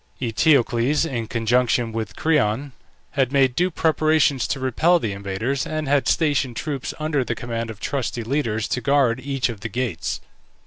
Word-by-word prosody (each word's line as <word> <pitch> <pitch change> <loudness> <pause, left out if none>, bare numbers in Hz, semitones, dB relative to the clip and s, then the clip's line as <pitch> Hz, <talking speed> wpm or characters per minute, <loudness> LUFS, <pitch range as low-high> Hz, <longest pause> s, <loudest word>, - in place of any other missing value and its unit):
Eteocles, 125 +2 +2
in 120 -7 -3
conjunction 115 +1 +1
with 110 -2 -4
Creon, 140 -4 +1 0.4
had 135 -2 +1
made 135 -3 +3
due 180 +5 +2
preparations 155 -4 +2
to 135 - -2
repel 145 +7 +3
the 115 -11 -2
invaders, 100 +7 -2
and 155 -1 -3
had 140 0 +2
stationed 145 -6 +1
troops, 140 0 -3
under 155 -3 0
the 120 - -3
command 115 0 -4
of 110 -2 -8
trusty 120 -3 -2
leaders, 115 -4 -1
to 125 - -1
guard 135 -4 +2
each 135 -1 -1
of 115 -4 -6
the 115 +3 -5
gates. 120 -5 -2
130 Hz, 165 wpm, -22 LUFS, 115-145 Hz, 0.4 s, made